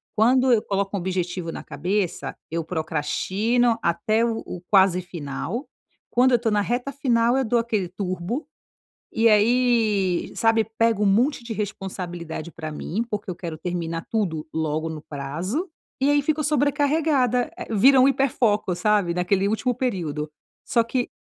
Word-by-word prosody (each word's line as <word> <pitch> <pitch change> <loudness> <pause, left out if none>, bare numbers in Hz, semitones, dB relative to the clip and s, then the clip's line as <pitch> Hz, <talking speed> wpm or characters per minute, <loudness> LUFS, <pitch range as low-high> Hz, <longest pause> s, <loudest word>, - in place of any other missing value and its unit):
Quando 250 +4 +4
eu 220 - +3
coloco 200 0 -2
um - - -1
objetivo 180 -1 -3
na - - -7
cabeça 185 -1 -2 0.2
eu 165 +1 -2
procrastino 190 +9 0
até 215 +7 +1
o 230 -1 -1
o 180 - -7
quase 190 -2 +5
final, 175 - -5 0.4
quando 255 +2 +4
eu 245 - +5
estou 230 -1 -1
na 210 0 +2
reta 245 +5 -1
final 240 -3 +2
eu 270 - +2
dou 235 +1 +2
aquele 220 -5 -1
turbo. 185 - -4 0.7
E 230 +1 +4
aí, 215 -4 +2
sabe, 225 -1 +3
pego 230 -2 +3
um - - +3
monte 240 +8 +2
de 235 - -5
responsabilidade 180 -5 -5
para 155 -2 -6
mim, 195 +8 -3
porque 205 -2 -4
eu - - -3
quero 170 -3 -6
terminar 165 -1 -4
tudo 175 -9 -1
logo 160 0 -1
no 155 -2 -7
prazo, 165 - -4 0.3
e 270 - +3
aí 290 0 +4
fico 305 +1 0
sobrecarregada, 285 -3 +2
eh, - - -7
vira 260 +6 +6
um 260 - +6
hiperfoco, 245 -8 +1
sabe, 200 -2 +2
naquele 185 +2 +1
último 220 +4 0
período. 165 - -2 0.4
Só 235 -4 +2
que, 245 +1 -1
210 Hz, 160 wpm, -24 LUFS, 175-245 Hz, 0.7 s, vira